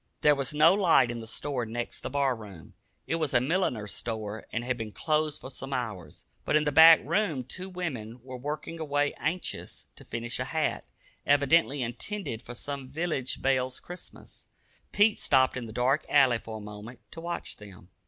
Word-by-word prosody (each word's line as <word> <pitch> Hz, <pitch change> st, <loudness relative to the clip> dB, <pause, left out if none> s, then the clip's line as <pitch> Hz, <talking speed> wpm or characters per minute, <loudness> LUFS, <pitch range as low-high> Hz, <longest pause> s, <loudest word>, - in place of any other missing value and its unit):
There 150 Hz, -, +6 dB
was 135 Hz, -2 st, -1 dB
no 155 Hz, +3 st, +6 dB
light 165 Hz, -, +4 dB
in 120 Hz, -, -5 dB
the 110 Hz, -, -8 dB
store 130 Hz, +2 st, -2 dB
next 120 Hz, +1 st, -4 dB
the -, -, -5 dB
bar 140 Hz, -1 st, +1 dB
room. 100 Hz, -7 st, -12 dB, 0.3 s
It 165 Hz, -, -1 dB
was 155 Hz, -4 st, -1 dB
a -, -, +7 dB
milliner's 125 Hz, -, 0 dB
store 110 Hz, -2 st, -5 dB
and 120 Hz, -, -2 dB
had 125 Hz, +1 st, -1 dB
been 110 Hz, -3 st, -6 dB
closed 155 Hz, +3 st, 0 dB
for 130 Hz, -, -8 dB
some 135 Hz, +1 st, -6 dB
hours. 105 Hz, -, -5 dB, 0.2 s
But -, -, +1 dB
in 155 Hz, -, +4 dB
the 150 Hz, -, 0 dB
back 160 Hz, +2 st, +9 dB
room 165 Hz, -4 st, 0 dB
two 185 Hz, +9 st, -6 dB
women 130 Hz, -, -5 dB
were 130 Hz, 0 st, -8 dB
working 150 Hz, +5 st, -5 dB
away 145 Hz, -2 st, 0 dB
anxious 180 Hz, +2 st, -3 dB
to -, -, -11 dB
finish 120 Hz, +1 st, -4 dB
a 125 Hz, -, -1 dB
hat, 155 Hz, +2 st, -1 dB, 0.4 s
evidently 145 Hz, -1 st, +3 dB
intended 120 Hz, -, -4 dB
for 120 Hz, 0 st, -9 dB
some 140 Hz, +1 st, -6 dB
village 145 Hz, -3 st, -2 dB
belle's 130 Hz, -1 st, +1 dB
Christmas. 180 Hz, +1 st, -12 dB, 0.4 s
Pete 205 Hz, +1 st, +4 dB
stopped 130 Hz, -2 st, +3 dB
in 125 Hz, -3 st, -5 dB
the -, -, -8 dB
dark 125 Hz, +6 st, +1 dB
alley 130 Hz, -5 st, +5 dB
for 110 Hz, -1 st, -7 dB
a -, -, -9 dB
moment 105 Hz, +4 st, -10 dB
to 165 Hz, -, -8 dB
watch 170 Hz, +1 st, -5 dB
them. 95 Hz, -3 st, -14 dB
135 Hz, 190 wpm, -28 LUFS, 120-155 Hz, 0.4 s, back